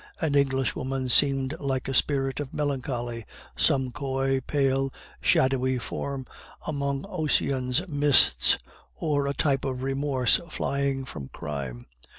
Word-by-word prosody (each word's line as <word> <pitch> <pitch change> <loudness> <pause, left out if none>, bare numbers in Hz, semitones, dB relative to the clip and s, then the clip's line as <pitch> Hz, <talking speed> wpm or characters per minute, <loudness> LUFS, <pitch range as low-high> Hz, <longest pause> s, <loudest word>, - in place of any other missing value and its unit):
An 150 - 0
English 135 -2 +1
woman 130 0 -3
seemed 135 +1 +4
like 135 -2 -2
a 135 - -2
spirit 135 0 +1
of 145 -2 -5
melancholy 125 -5 -2 0.3
some 130 -2 +2
coy, 135 -1 -1
pale, 135 -1 0 0.3
shadowy 130 -1 +2
form 130 +4 -4 0.4
among 140 -1 -2
Ossian's 150 -4 0
mists, 145 - +4 0.4
or 145 -3 0
a 140 - 0
type 135 -3 +1
of 130 -2 -3
remorse 135 -2 +2
flying 140 -3 -1
from 70 - -8
crime. 65 -5 -6
135 Hz, 125 wpm, -26 LUFS, 130-140 Hz, 0.4 s, seemed